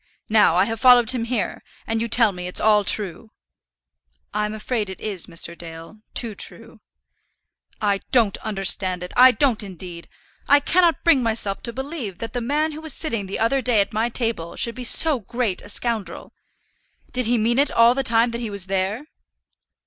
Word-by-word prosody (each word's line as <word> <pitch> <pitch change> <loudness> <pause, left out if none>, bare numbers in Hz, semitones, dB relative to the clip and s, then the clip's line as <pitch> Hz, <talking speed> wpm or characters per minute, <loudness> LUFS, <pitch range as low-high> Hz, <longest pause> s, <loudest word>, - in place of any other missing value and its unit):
Now, 210 -6 +4
I 185 +2 +3
have 225 0 -4
followed 245 -2 +5
him 245 -3 -2
here; 230 -4 -3 0.2
and 225 0 -2
you 230 - -1
tell 230 -1 +4
me 180 -1 -7
it's 180 - +1
all 210 -1 +3
true." 200 +1 0 1.0
"I 210 0 -1
am 210 +1 -5
afraid 215 -1 -3
it 190 - -8
is, 200 -5 -5
Mr. 165 0 0
Dale; 165 +4 -11 0.2
too 230 -3 0
true." - - -6 1.0
"I 200 -2 0
don't 230 -6 +3
understand 185 -2 +1
it; 180 - -8
I 255 +1 +8
don't, 255 -3 +1
indeed. 180 -3 -9 0.4
I 285 - +6
cannot 340 +3 +1
bring 330 -6 +4
myself 220 -4 0
to 235 - -5
believe 265 - -6
that 225 - -7
the 245 - -3
man 300 +6 -1
who 305 +1 -9
was 315 -3 -1
sitting 230 -11 -3
the 190 - -4
other 245 +5 +1
day 245 -4 +2
at 200 +2 0
my 225 +3 0
table 225 -9 -3
should 235 - -1
be 255 - -8
so 295 +3 +5
great 225 -2 -3
a - - -13
scoundrel. 210 -5 -2 0.8
Did 255 -2 -1
he 240 +1 +2
mean 235 +3 +1
it 285 - +2
all 230 +1 +5
the 270 - -1
time 230 -2 +2
that 235 0 -5
he 230 - -4
was 200 -3 -3
there?" 195 +4 -2
225 Hz, 195 wpm, -21 LUFS, 195-245 Hz, 1.0 s, I